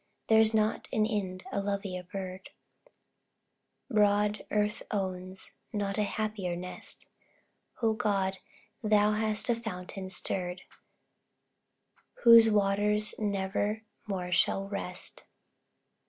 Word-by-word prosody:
There's 220 0 +6
not 215 -1 +1
in 215 -4 +2
Ind 190 -4 -2
a 200 - 0
lovelier 195 -2 -3
bird; 185 +1 -7 1.4
Broad 210 -2 +2
earth 210 0 0
owns 185 -2 -3
not 205 0 -2
a - - +3
happier 210 -3 -2
nest 180 +1 -6 0.8
O 225 -1 +4
God, 195 -4 0 0.4
thou 210 -1 +4
hast 215 0 0
a 240 - +3
fountain 190 -4 -6
stirred, 180 -1 -2 1.6
Whose 230 -1 +9
waters 210 +1 +2
never 205 +1 -1 0.2
more 180 -3 -3
shall 195 +2 +2
rest! 190 -2 -4
205 Hz, 100 wpm, -30 LUFS, 190-215 Hz, 1.6 s, Whose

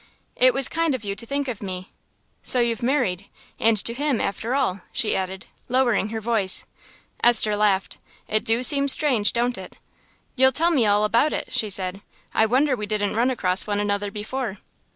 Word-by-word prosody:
"It 255 0 +4
was 270 -1 +2
kind 330 -3 -1
of 250 - -8
you 200 -1 -4
to 230 +4 -9
think 280 +1 -2
of 235 -5 -5
me. 185 -1 -7 0.5
So 250 - +4
you've 235 -2 0
married, 235 -8 -1 0.3
and 225 -1 +2
to 235 - -1
him 280 -1 -1
after 230 +5 -3
all!" 205 -9 -1
she 215 - 0
added, 190 0 -4 0.2
lowering 240 -4 +1
her 225 0 -4
voice. 220 -4 0 0.6
Esther 220 -3 +5
laughed. 205 -2 0 0.3
"It 215 0 0
do 230 +2 +1
seem 280 +1 +5
strange, 260 -7 +4
don't 240 +1 -1
it?" - - -11 0.6
"You'll 265 0 +4
tell 335 +3 +2
me 255 -9 +2
all 205 +1 +2
about 235 +8 +1
it," - - -4
she 215 - 0
said. 190 0 0 0.3
"I 220 - +2
wonder 260 +4 +1
we 210 -3 -6
didn't 205 -1 -2
run 240 +3 +2
across 190 -7 0
one 205 -1 -1
another 205 0 -1
before." 215 +1 -5
225 Hz, 190 wpm, -22 LUFS, 205-255 Hz, 0.6 s, Esther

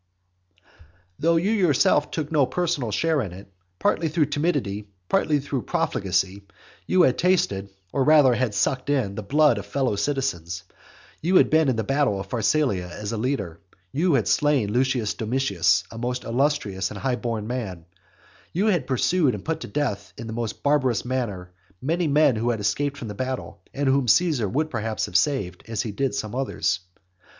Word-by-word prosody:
XXIX. 90 0 -39 0.6
Though 165 +1 +3
you 180 +6 +2
yourself 155 - +3
took 155 -2 -4
no 145 -5 +3
personal 170 -9 -1
share 155 +7 +1
in 100 - -4
it, 95 +1 -13 0.2
partly 165 - +1
through 155 0 +2
timidity, 145 - -1 0.2
partly 150 +8 +2
through 140 -2 -3
profligacy, 95 -1 -1 0.5
you 185 -1 +4
had 125 -5 +2
tasted, 100 - +1 0.2
or 135 - +2
rather 150 -3 +6
had 120 -3 -1
sucked 130 +1 0
in, 130 -9 +1
the 105 - -5
blood 150 +8 +3
of - - -9
fellow 130 -6 0
citizens: 100 - -2 0.6
you 180 +4 +1
had - - +5
been 160 -2 +4
in 130 - +1
the 110 - -1
battle 135 -4 +1
of 95 0 -7
Pharsalia 110 -5 +1
as 105 +3 -6
a 115 - -2
leader; 105 - -2 0.3
you 160 +2 +2
had 110 -7 +1
slain 140 -9 +2
Lucius 125 -3 +1
Domitius, 100 -7 +1
a 115 - -8
most 125 +1 -2
illustrious 115 -7 0
and 105 - -8
high 130 +1 0
born 115 -3 -3
man; 105 -9 -5 0.7
you 190 +5 +1
had 175 -12 +1
pursued 135 +1 +2
and 100 - -9
put 160 0 -1
to - - -7
death 115 -9 -3
in 115 - -7
the 110 - -6
most 115 -2 -4
barbarous 130 -6 +2
manner 105 -8 -3 0.3
many 165 +5 0
men 145 -4 +4
who 115 +2 0
had 115 -2 0
escaped 140 +8 -1
from 125 -5 -6
the 105 - -5
battle, 130 +4 -5
and 140 0 -2
whom 135 -1 +2
Caesar 140 - +3
would 155 +6 -1
perhaps 110 -1 -2
have - - -11
saved, 95 - +1
as 115 -3 -2
he 110 - -4
did 135 +6 -1
some 110 -1 -4
others. 125 -7 -1
125 Hz, 185 wpm, -24 LUFS, 105-145 Hz, 0.7 s, rather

